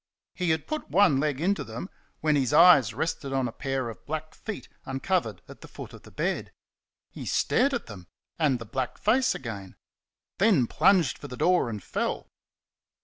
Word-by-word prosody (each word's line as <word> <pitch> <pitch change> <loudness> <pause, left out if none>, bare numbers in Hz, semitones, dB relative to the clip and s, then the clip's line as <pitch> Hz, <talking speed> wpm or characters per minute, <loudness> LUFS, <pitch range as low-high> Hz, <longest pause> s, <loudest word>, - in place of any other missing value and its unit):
He 180 -2 -1
had 160 -1 +1
put 310 0 -4
one 180 -8 +4
leg 145 -2 0
into 195 +5 +1
them 115 +10 -7 0.3
when 155 -1 +3
his 130 -4 +1
eyes 140 - +7
rested 145 -4 -3
on 135 -2 +1
a - - -5
pair 135 -1 -3
of 115 - -9
black 155 +1 -4
feet 215 -3 -7 0.2
uncovered 170 +8 -2
at - - -13
the - - -10
foot - - -10
of - - -12
the - - -15
bed. - - -2 0.6
He - - -8
stared 275 +3 +2
at 240 -3 -2
them 95 -6 -11 0.3
and 145 -5 +3
the 115 - -8
black 125 +3 -3
face 255 +5 +2
again 100 -6 -7 0.6
then 195 - +4
plunged 170 - +3
for 145 - -8
the 125 -2 -8
door 180 -6 +3
and 105 -4 -6
fell. - - -3
145 Hz, 185 wpm, -27 LUFS, 125-180 Hz, 0.6 s, eyes